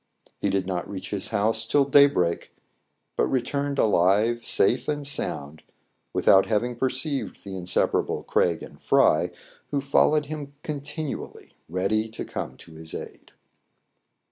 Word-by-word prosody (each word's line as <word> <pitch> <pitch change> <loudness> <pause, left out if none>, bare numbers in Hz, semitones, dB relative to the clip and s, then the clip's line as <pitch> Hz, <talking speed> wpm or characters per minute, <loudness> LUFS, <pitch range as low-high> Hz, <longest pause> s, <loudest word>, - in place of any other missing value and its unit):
He - - 0
did 95 -1 0
not 90 -2 -3
reach 95 -2 -6
his 100 -2 -2
house 110 +1 +1
till 140 +5 +3
daybreak, 140 -12 +3 0.6
but - - +2
returned 140 +2 -1
alive 105 +4 +3
safe 120 +5 +2
and 145 -1 -2
sound 80 - -3 0.5
without 95 0 +5
having 120 +3 0
perceived 130 +3 -2
the 100 -1 -7
in 90 -1 -6
separable - - +1
Craig 85 -2 +1
and - - -12
Fry, - - +3 0.4
who 145 - 0
followed 150 +2 +3
him 145 -1 -7
con 150 -2 -4
tinually, 150 0 -6 0.2
ready 100 +5 0
to 110 - -6
come - - -6
to 80 - -15
his 80 0 -8
aid. - - -9
115 Hz, 145 wpm, -25 LUFS, 95-140 Hz, 0.6 s, without